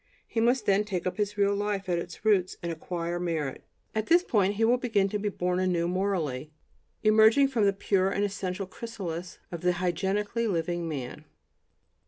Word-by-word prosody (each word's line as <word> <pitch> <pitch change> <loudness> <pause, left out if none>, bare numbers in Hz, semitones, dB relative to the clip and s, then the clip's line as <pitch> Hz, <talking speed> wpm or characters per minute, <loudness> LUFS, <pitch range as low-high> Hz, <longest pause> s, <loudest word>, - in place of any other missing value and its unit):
He 230 - -2
must 240 0 +2
then 200 +1 +3
take 195 -4 -3
up 185 - -2
his 205 0 -1
real 200 0 +3
life 205 -1 -2
at 175 -2 +1
its 175 +4 -8
roots 195 -4 +3
and 170 - -2
"acquire 170 +1 -3
merit." 160 -6 -2 0.3
At 220 0 -1
this 345 +2 +5
point 205 - +2
he 225 +2 +2
will 245 +2 +3
begin 210 -6 +1
to 210 - -2
be 205 +1 -1
born 180 -2 -1
anew 180 -2 +1
morally, 175 -7 -1 0.5
emerging 220 +5 +6
from 230 -6 +2
the 200 - +5
pure 195 -1 +1
and 200 +1 0
essential 195 -1 -2
chrysalis 185 -5 -6
of 170 -2 -5
the 180 0 +2
"hygienically" 190 +6 -1
living 175 -2 -1
man. 140 +1 -6
195 Hz, 185 wpm, -28 LUFS, 175-210 Hz, 0.5 s, emerging